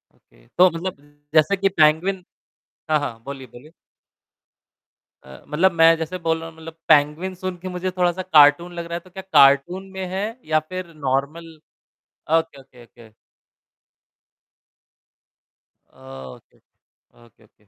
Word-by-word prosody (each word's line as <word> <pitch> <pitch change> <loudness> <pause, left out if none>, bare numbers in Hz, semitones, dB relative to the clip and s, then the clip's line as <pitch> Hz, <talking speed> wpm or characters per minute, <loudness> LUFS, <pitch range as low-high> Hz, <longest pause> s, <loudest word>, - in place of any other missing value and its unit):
Okay. - - -27
तो 185 +1 +7
मतलब 170 +3 -5 0.4
जैसे 160 +6 +3
कि 195 +1 +1
पैंगुइन 175 +3 +2 0.7
हाँ, 155 - +4
हाँ। 115 -5 -6
बोलिए, 135 -1 -8
बोलिए? 125 +7 -16 1.5
अ, 65 0 -14
मतलब 180 +6 +2
मैं 165 0 +5
जैसे 165 +3 -5
बोल 165 -1 -1
रहा 165 0 -8
हूँ 160 - -18
मतलब 160 0 -11
पैंगुइन 150 +6 +2
सुन 185 0 -5
के 185 +2 -9
मुझे 185 +1 -4
थोड़ा-सा 180 0 0
कार्टून 160 0 +4
लग 170 -1 -6
रहा 170 - -8
है, 170 - -2
तो 185 - -20
क्या 190 +1 -9
कार्टून 140 +8 +4
में 190 0 -5
है 190 +3 -3 0.2
या 155 0 +2
फ़िर 185 -2 -7
normal? 155 +3 -3 0.8
Okay, 160 -4 -6
okay, 125 -2 -18
okay. 115 -2 -19 2.8
Okay, 65 -1 -13
okay. 120 - -28
Okay, 115 -1 -25
okay. 105 0 -30
165 Hz, 145 wpm, -21 LUFS, 140-180 Hz, 2.8 s, तो